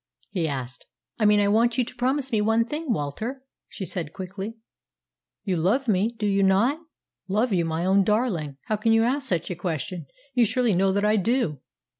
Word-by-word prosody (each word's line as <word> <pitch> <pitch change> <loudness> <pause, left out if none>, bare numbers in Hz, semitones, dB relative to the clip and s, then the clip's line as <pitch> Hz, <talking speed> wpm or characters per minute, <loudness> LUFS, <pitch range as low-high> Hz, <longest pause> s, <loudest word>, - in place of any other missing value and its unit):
he 175 -5 0
asked. 130 -3 -5 0.3
"I 215 - +3
mean 210 0 +5
I 205 - +3
want 230 +4 +3
you 250 - +2
to 250 - -10
promise 265 +2 0
me 220 -2 +2
one 225 +2 +2
thing, 300 +2 -3
Walter," 220 - -3 0.2
she 190 - -6
said 165 -4 -4
quickly. 195 +3 -6 0.9
"You 190 -4 -1
love 220 +11 +1
me, 205 -1 +3
do 220 -2 -4
you 200 -1 +2
not?" 200 +10 +3 0.5
"Love 215 +4 +1
you, 170 -3 +2
my 165 +1 -2
own 195 +1 +4
darling! 190 - 0
How 215 - -1
can 225 +2 +2
you 225 0 +4
ask 270 +3 0
such 170 -1 -1
a - - -3
question? 170 -2 -4 0.3
You 245 - +4
surely 245 -1 +1
know 190 +2 +3
that 200 +2 +1
I 215 +1 +3
do!" 210 - 0
205 Hz, 200 wpm, -25 LUFS, 180-235 Hz, 0.9 s, mean